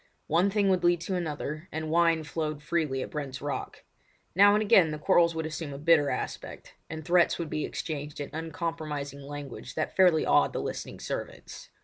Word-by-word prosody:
One 175 Hz, +5 st, +3 dB
thing 200 Hz, 0 st, +1 dB
would 185 Hz, -2 st, +2 dB
lead 175 Hz, 0 st, +4 dB
to 185 Hz, +2 st, -3 dB
another, 155 Hz, -1 st, -4 dB
and 160 Hz, 0 st, -4 dB
wine 165 Hz, -1 st, +3 dB
flowed 150 Hz, 0 st, -4 dB
freely 150 Hz, -5 st, -1 dB
at -, -, -8 dB
Brent's 140 Hz, -4 st, -5 dB
Rock. 145 Hz, 0 st, -5 dB, 0.5 s
Now 205 Hz, +3 st, +6 dB
and 215 Hz, -, +2 dB
again 190 Hz, -5 st, +5 dB
the 155 Hz, -, -3 dB
quarrels 170 Hz, +2 st, +3 dB
would 160 Hz, -1 st, -2 dB
assume 155 Hz, -2 st, -5 dB
a -, -, -6 dB
bitter 155 Hz, -1 st, +4 dB
aspect, -, -, -5 dB, 0.2 s
and 155 Hz, -1 st, -6 dB
threats 175 Hz, 0 st, +3 dB
would 165 Hz, -3 st, -5 dB
be 155 Hz, -, -1 dB
exchanged 150 Hz, -2 st, -5 dB
in 145 Hz, -, -5 dB
uncompromising 155 Hz, -3 st, -4 dB
language 145 Hz, -1 st, -8 dB
that 155 Hz, -, -2 dB
fairly 180 Hz, -4 st, +5 dB
awed -, -, +3 dB
the -, -, -2 dB
listening -, -, -5 dB
servants. -, -, -6 dB
160 Hz, 190 wpm, -28 LUFS, 145-170 Hz, 0.5 s, Now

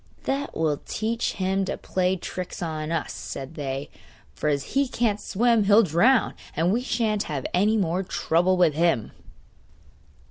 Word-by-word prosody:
'That 280 Hz, +1 st, -2 dB
will 155 Hz, -3 st, 0 dB
teach 225 Hz, +2 st, -2 dB
him 190 Hz, 0 st, 0 dB
to 190 Hz, -, -3 dB
play 185 Hz, 0 st, 0 dB
tricks 180 Hz, 0 st, -6 dB
on 155 Hz, -1 st, -3 dB
us,' 165 Hz, -2 st, -2 dB
said 135 Hz, +3 st, -7 dB
they. 140 Hz, -2 st, -4 dB, 0.5 s
'For 150 Hz, -, -1 dB
as 140 Hz, -1 st, -2 dB
he 275 Hz, 0 st, +2 dB
can't 225 Hz, -4 st, 0 dB
swim 230 Hz, 0 st, +2 dB
he'll 210 Hz, +3 st, +6 dB
drown, 220 Hz, -, +3 dB, 0.2 s
and 170 Hz, +5 st, +2 dB
we 240 Hz, -, +1 dB
sha'n't 225 Hz, -4 st, 0 dB
have 140 Hz, -4 st, -3 dB
any 210 Hz, +5 st, +3 dB
more 180 Hz, -2 st, 0 dB
trouble 180 Hz, 0 st, +1 dB
with 175 Hz, -4 st, +4 dB
him! 160 Hz, -8 st, +1 dB
185 Hz, 155 wpm, -25 LUFS, 160-220 Hz, 0.5 s, he'll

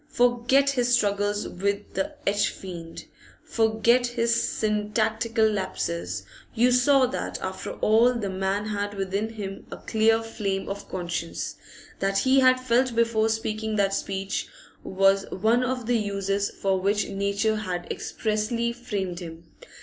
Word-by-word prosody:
Forget 245 Hz, +2 st, +3 dB
his 245 Hz, -2 st, +2 dB
struggles 205 Hz, -2 st, 0 dB
with 200 Hz, +3 st, -3 dB
the 300 Hz, +1 st, -2 dB
h 205 Hz, +1 st, +2 dB
fiend; 170 Hz, -3 st, -8 dB, 0.4 s
forget 230 Hz, +2 st, +2 dB
his 235 Hz, -1 st, +1 dB
syntactical 220 Hz, +1 st, 0 dB
lapses; 170 Hz, -, -2 dB, 0.3 s
you 245 Hz, +2 st, +4 dB
saw 260 Hz, +2 st, +5 dB
that 255 Hz, -, -4 dB
after -, -, -5 dB
all 225 Hz, +3 st, +4 dB
the 220 Hz, -4 st, -2 dB
man 195 Hz, +2 st, -1 dB
had 205 Hz, -1 st, -3 dB
within 195 Hz, +2 st, -2 dB
him 195 Hz, -3 st, -7 dB
a -, -, -7 dB
clear 225 Hz, 0 st, +2 dB
flame 200 Hz, -4 st, -3 dB
of 200 Hz, +1 st, -6 dB
conscience; 175 Hz, -2 st, -4 dB, 0.4 s
that 195 Hz, 0 st, 0 dB
he 265 Hz, +5 st, +4 dB
had 255 Hz, -1 st, +5 dB
felt 255 Hz, 0 st, +1 dB
before 225 Hz, -1 st, +2 dB
speaking 220 Hz, -1 st, -2 dB
that 195 Hz, -1 st, +2 dB
speech 195 Hz, 0 st, -2 dB, 0.4 s
was 195 Hz, +1 st, +2 dB
one 225 Hz, +6 st, +2 dB
of 255 Hz, -1 st, -2 dB
the 240 Hz, 0 st, +2 dB
uses 200 Hz, -1 st, -1 dB
for 190 Hz, -1 st, -1 dB
which 200 Hz, +2 st, +1 dB
Nature 200 Hz, +2 st, 0 dB
had 180 Hz, -4 st, -3 dB
expressly 230 Hz, +2 st, -1 dB
framed 200 Hz, -7 st, -4 dB
him. 165 Hz, -2 st, -10 dB
215 Hz, 140 wpm, -26 LUFS, 195-235 Hz, 0.4 s, saw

